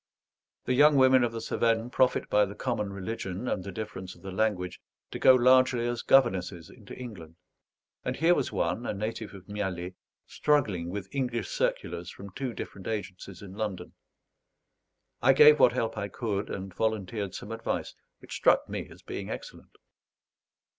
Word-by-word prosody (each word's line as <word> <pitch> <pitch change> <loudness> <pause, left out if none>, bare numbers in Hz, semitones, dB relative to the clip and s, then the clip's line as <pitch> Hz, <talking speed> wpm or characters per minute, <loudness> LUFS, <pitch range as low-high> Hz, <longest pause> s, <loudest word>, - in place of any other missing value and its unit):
The 130 - +1
young 145 +3 +6
women 130 -1 +6
of 120 - +1
the 115 - -5
Cevennes 115 +1 0
profit 130 0 +2
by 105 0 +4
the 100 +1 -8
common 110 -6 -2
religion 100 +1 -5
and 95 - -1
the 100 - -6
difference 95 -3 -6
of - - -20
the 95 - -6
language 95 -3 -1 0.3
to - - -5
go 130 - +7
largely 130 -1 +4
as 120 -1 -2
governesses 95 -9 +2
into 105 -5 -12
England; 95 -11 -9 0.7
and - - -2
here 165 +2 +4
was 145 -6 -1
one, 120 - -1
a - - -2
native 105 0 -4
of 95 -1 -13
Mialet, 95 -3 -4 0.3
struggling 105 - 0
with 95 0 -5
English 125 -6 -2
circulars 85 +1 -2
from 100 0 -10
two 135 +1 -4
different 95 -4 -8
agencies 100 -3 -5
in 95 -2 -9
London. 105 -2 -4 1.3
I 135 +2 +6
gave 150 +2 +8
what 120 - +6
help 115 -3 -1
I 100 - -2
could; 100 0 -3
and 95 -1 -6
volunteered 105 -1 -2
some 105 - -7
advice, 115 0 -3 0.3
which - - -10
struck - - +3
me - - -5
as - - -15
being - - -6
excellent. - - -8
110 Hz, 165 wpm, -28 LUFS, 95-125 Hz, 1.3 s, gave